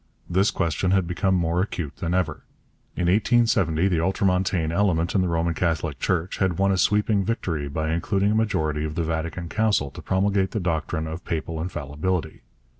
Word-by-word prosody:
This 95 +4 +2
question 85 +3 0
had 95 -1 +3
become 95 +2 0
more 85 0 +1
acute 85 -7 -4
than 85 +1 -1
ever. 90 -3 -1 0.5
In - - -2
1870 95 -3 +3
the 90 -4 +1
ultramontane 90 -2 +1
element 85 -2 +1
in 95 - +3
the 90 - +1
Roman 85 0 0
Catholic 80 -4 -1
Church 90 0 -1
had 95 -4 +1
won 95 0 +3
a 95 - +1
sweeping 105 +2 +2
victory 85 -9 -2
by 80 +2 -2
inducing 95 +4 +1
a - - +1
majority 80 -9 0
of 75 0 -4
the 85 - 0
Vatican 80 +2 -3
Council 100 -8 +1
to - - -10
promulgate 95 0 +1
the 110 - 0
doctrine 80 -2 -1
of 80 +3 -6
Papal 80 -1 -3
Infallibility. 80 0 -3
90 Hz, 180 wpm, -24 LUFS, 80-95 Hz, 0.5 s, had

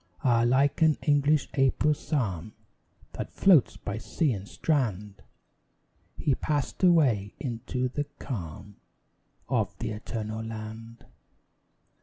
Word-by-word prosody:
Ah! 120 -4 +4
like 135 +6 +2
an 160 -2 +5
English 145 0 +3
April 135 +2 +3
psalm, 110 - -3 0.6
That - - -6
floats 175 -10 +4
by 105 +2 -5
sea 140 +4 0
and 100 -1 -6
strand, 105 - -1 1.0
He 145 - +1
passed 145 +1 -2
away 135 - +3
into 125 0 -2
the 145 +4 -3
calm 100 - -7 0.7
Of - - -1
the - - -3
Eternal 110 0 -5
Land. 110 +1 -8
120 Hz, 110 wpm, -28 LUFS, 110-145 Hz, 1.0 s, an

